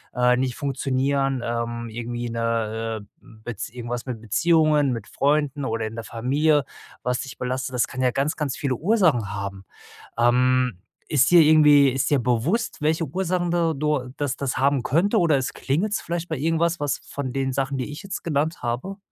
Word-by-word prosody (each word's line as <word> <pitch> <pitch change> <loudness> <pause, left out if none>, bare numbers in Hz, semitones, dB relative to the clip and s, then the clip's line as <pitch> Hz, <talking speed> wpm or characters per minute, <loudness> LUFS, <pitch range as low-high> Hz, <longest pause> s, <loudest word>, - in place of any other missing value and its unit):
äh, 125 0 +3
nicht 125 -1 -1
funktionieren, 135 -1 0
ähm, 115 0 -3
irgendwie 120 +1 -4
'ne, 115 -1 -2
äh, 105 - -14 0.4
Bez 120 -3 -5
irgendwas 120 +1 -5
mit 120 -4 -5
Beziehungen, 150 - +3
mit 115 - -6
Freunden 145 -1 0
oder 115 -2 -2
in 110 - -8
der 115 - -5
Familie, 145 +6 +1 0.4
was 125 0 -1
dich 135 -1 -9
belastet, 130 +1 -3
das 125 - +1
kann 130 - -5
ja 125 -1 +3
ganz 140 +4 0
ganz 145 -4 -2
viele 135 -3 -1
Ursachen 160 - +2
haben. 100 -1 -5 0.5
Ähm, 125 -1 +3 0.3
ist 145 0 +3
dir 175 - +8
irgendwie 150 -2 +6
ist 135 +3 -1
dir 145 - +4
bewusst, 125 - 0
welche 160 +2 +1
Ursachen 175 +3 -1
da 170 -1 +1
du 140 -3 -1
das 145 -2 -1
das 135 -2 -2
haben 140 -1 +2
könnte 195 - +2
oder 165 -6 +3
es 130 - -2
klingelt's 195 +10 -1
vielleicht 170 0 -4
bei 160 - -2
irgendwas 165 +3 +1
was 145 -1 -1
von 130 -3 -6
den 135 -1 -1
Sachen, 135 +1 -2
die 125 - -3
ich 150 - -8
jetzt 195 -1 -6
genannt 160 +1 -1
habe? 125 +12 -3
135 Hz, 180 wpm, -24 LUFS, 120-155 Hz, 0.5 s, dir